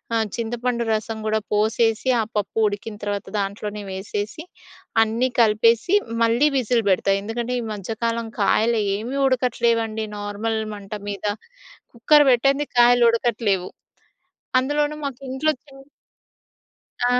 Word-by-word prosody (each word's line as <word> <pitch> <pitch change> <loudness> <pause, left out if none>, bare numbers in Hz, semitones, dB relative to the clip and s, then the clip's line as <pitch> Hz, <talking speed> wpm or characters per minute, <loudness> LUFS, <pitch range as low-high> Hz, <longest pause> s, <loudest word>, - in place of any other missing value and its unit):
ఆహ్, 220 -1 +1
చింతపండు 235 +1 -2
రసం 220 +1 -3
గూడా 215 0 +1
పోసేసి, 220 +3 +1
ఆ - - 0
పప్పు 205 +1 -3
ఉడికిన 210 +1 -5
తర్వాత 205 -1 -3
దాంట్లోనే 205 +1 -4
వేసేసి, 205 - -5 0.6
అన్నీ 230 +4 0
కలిపేసి 230 - +3 0.3
మళ్ళీ 235 +6 +3
విజిల్ 240 -2 +1
పెడతా. 190 +1 +2
ఎందుకంటే 235 +3 -3
ఈ - - -5
మధ్యకాలం 230 +3 -3
కాయలు 220 +3 +2 0.2
ఏమీ 240 +6 -4
ఉడకట్లేవండి. 230 -3 0
నార్మల్ 205 +2 -2 0.2
మంట 200 0 -10 0.2
మీద. 200 0 -5 0.7
కుక్కర్ 295 +5 +5
పెట్టంది 275 +4 +2
కాయలు 240 0 +6
ఉడకట్లేవు. 215 -5 0 0.9
అందులోనూ 295 +3 0
మాకు 275 -2 -5
ఇంట్లో 305 +4 +1
చిన్ 270 -2 -15 1.3
ఆ! 250 0 +3
230 Hz, 120 wpm, -22 LUFS, 210-245 Hz, 1.3 s, కాయలు